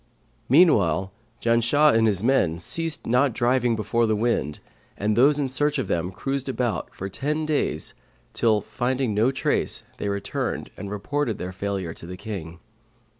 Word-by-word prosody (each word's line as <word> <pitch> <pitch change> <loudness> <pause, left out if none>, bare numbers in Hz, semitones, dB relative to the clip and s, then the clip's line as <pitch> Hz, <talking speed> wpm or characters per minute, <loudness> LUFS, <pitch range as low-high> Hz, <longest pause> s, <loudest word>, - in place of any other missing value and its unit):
Meanwhile, 105 - +4 0.3
Janshah 120 +6 +4
and 115 0 +4
his 100 -2 +1
men 115 -10 +2
ceased 165 - -2
not 125 +2 +2
driving 120 0 +2
before 110 +2 +1
the 110 - +2
wind 105 -9 0 0.4
and 105 +1 0
those 140 +5 +5
in 145 -2 0
search 145 +3 0
of 130 - -1
them 85 +2 -1
cruised 135 +8 -3
about 120 -6 -2
for 95 - -6
ten 150 +10 -2
days 145 - -1 0.4
till, 110 -2 +2
finding 125 -2 -1
no 110 +5 +3
trace 135 - 0
they 100 - -2
returned 100 0 -3
and 100 +1 -7
reported 115 +4 -2
failure 95 -3 -3
to 85 - -11
the 90 +1 -7
King. 90 -5 -6
115 Hz, 155 wpm, -24 LUFS, 100-135 Hz, 0.4 s, those